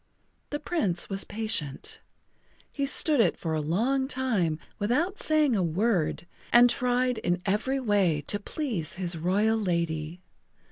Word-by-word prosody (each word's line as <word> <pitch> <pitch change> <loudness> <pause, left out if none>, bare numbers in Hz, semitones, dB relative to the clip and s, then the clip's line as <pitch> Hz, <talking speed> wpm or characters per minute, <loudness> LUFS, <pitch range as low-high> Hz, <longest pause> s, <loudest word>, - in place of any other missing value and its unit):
The 295 - -3
Prince 275 - -1
was 195 0 0
patient. 205 -10 -3 0.7
He 280 -1 -2
stood 295 +1 +3
it - - +2
for 160 -2 -3
a 155 - 0
long 240 - 0
time 225 - 0 0.2
without 295 - 0
saying 305 -5 +2
a 195 - +1
word 175 0 0 0.3
and 240 0 +7
tried 250 -1 +1
in 175 0 0
every 230 +7 0
way 200 - +2
to 205 - -1
please 205 - -3
his 180 -1 -2
royal 205 +7 +1
lady. 170 -3 -2
210 Hz, 140 wpm, -27 LUFS, 175-255 Hz, 0.7 s, and